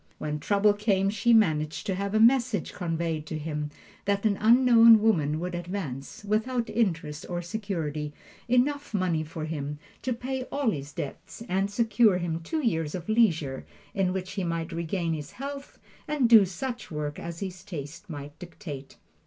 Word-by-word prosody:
When 150 Hz, 0 st, -3 dB
trouble 205 Hz, +6 st, +3 dB
came 200 Hz, -2 st, +1 dB
she 215 Hz, +3 st, +2 dB
managed 155 Hz, -9 st, +3 dB
to 195 Hz, -, 0 dB
have 200 Hz, +2 st, -2 dB
a -, -, +4 dB
message 235 Hz, -4 st, +3 dB
conveyed 165 Hz, -2 st, -2 dB
to 155 Hz, -, -3 dB
him 150 Hz, -1 st, -3 dB, 0.4 s
that 200 Hz, +1 st, 0 dB
an 210 Hz, -2 st, +3 dB
unknown 230 Hz, -1 st, +7 dB
woman 155 Hz, -9 st, +2 dB
would 180 Hz, +1 st, -4 dB
advance, 175 Hz, -3 st, -5 dB
without 230 Hz, +3 st, 0 dB
interest 165 Hz, -8 st, -1 dB
or 175 Hz, 0 st, -3 dB
security, 165 Hz, -7 st, -3 dB, 0.4 s
enough 270 Hz, +1 st, +1 dB
money 180 Hz, -5 st, +1 dB
for 155 Hz, 0 st, -5 dB
him 150 Hz, -2 st, -4 dB, 0.2 s
to 260 Hz, -, -2 dB
pay 255 Hz, +2 st, -3 dB
all 280 Hz, -5 st, 0 dB
his 145 Hz, -4 st, -5 dB
debts 165 Hz, +8 st, -7 dB
and 195 Hz, +1 st, 0 dB
secure 215 Hz, -2 st, +3 dB
him 170 Hz, -2 st, -2 dB
two 295 Hz, -, -3 dB
years 165 Hz, -7 st, 0 dB
of 180 Hz, +2 st, -6 dB
leisure 165 Hz, -, +2 dB, 0.3 s
in 190 Hz, -2 st, +1 dB
which 185 Hz, 0 st, -4 dB
he 195 Hz, -, -3 dB
might 165 Hz, 0 st, -2 dB
regain 170 Hz, 0 st, -1 dB
his 150 Hz, -2 st, -6 dB
health 275 Hz, +1 st, -7 dB, 0.3 s
and 295 Hz, -5 st, +2 dB
do 225 Hz, -4 st, +8 dB
such 235 Hz, +7 st, -5 dB
work 150 Hz, -2 st, -4 dB
as 170 Hz, 0 st, -6 dB
his 185 Hz, -2 st, -5 dB
taste 165 Hz, 0 st, -8 dB
might 145 Hz, -2 st, -8 dB
dictate. 160 Hz, -6 st, -9 dB
185 Hz, 170 wpm, -27 LUFS, 160-220 Hz, 0.4 s, do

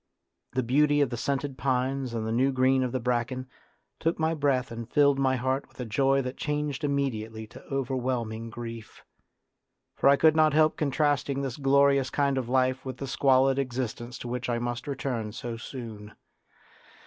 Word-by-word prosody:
The 130 Hz, 0 st, 0 dB
beauty 145 Hz, +4 st, +3 dB
of 140 Hz, -, +1 dB
the -, -, -2 dB
scented 140 Hz, +2 st, -2 dB
pines 130 Hz, -1 st, -1 dB
and 110 Hz, -1 st, -2 dB
the 110 Hz, -, -2 dB
new 130 Hz, +4 st, +2 dB
green 130 Hz, 0 st, +3 dB
of 125 Hz, -1 st, -1 dB
the 130 Hz, -, -1 dB
bracken 125 Hz, +1 st, -1 dB, 0.5 s
took 165 Hz, +1 st, 0 dB
my 160 Hz, 0 st, +1 dB
breath 140 Hz, -5 st, 0 dB
and 115 Hz, -1 st, -7 dB
filled 140 Hz, -1 st, +4 dB
my 130 Hz, -1 st, +2 dB
heart 130 Hz, +2 st, -1 dB
with -, -, -25 dB
a 125 Hz, -, -3 dB
joy 135 Hz, +4 st, +2 dB
that 125 Hz, +1 st, -5 dB
changed 150 Hz, -1 st, -2 dB
immediately 115 Hz, -6 st, -2 dB
to 105 Hz, -, -13 dB
overwhelming 125 Hz, -4 st, -2 dB
grief; 115 Hz, -1 st, -8 dB, 0.9 s
for -, -, +4 dB
I 140 Hz, -, +7 dB
could 155 Hz, +2 st, +4 dB
not 155 Hz, -2 st, +4 dB
help 155 Hz, 0 st, +4 dB
contrasting 140 Hz, -1 st, 0 dB
this 130 Hz, -3 st, -4 dB
glorious 140 Hz, -1 st, +3 dB
kind 140 Hz, -2 st, +1 dB
of 120 Hz, -2 st, -5 dB
life 130 Hz, 0 st, +1 dB
with 130 Hz, -1 st, -6 dB
the 135 Hz, -, -5 dB
squalid 135 Hz, 0 st, +3 dB
existence 125 Hz, -2 st, -3 dB
to -, -, -7 dB
which 125 Hz, 0 st, -3 dB
I 120 Hz, -, +1 dB
must 120 Hz, +2 st, -4 dB
return 125 Hz, -6 st, -3 dB
so 120 Hz, 0 st, -5 dB
soon. 115 Hz, -3 st, -8 dB
130 Hz, 180 wpm, -27 LUFS, 120-140 Hz, 0.9 s, I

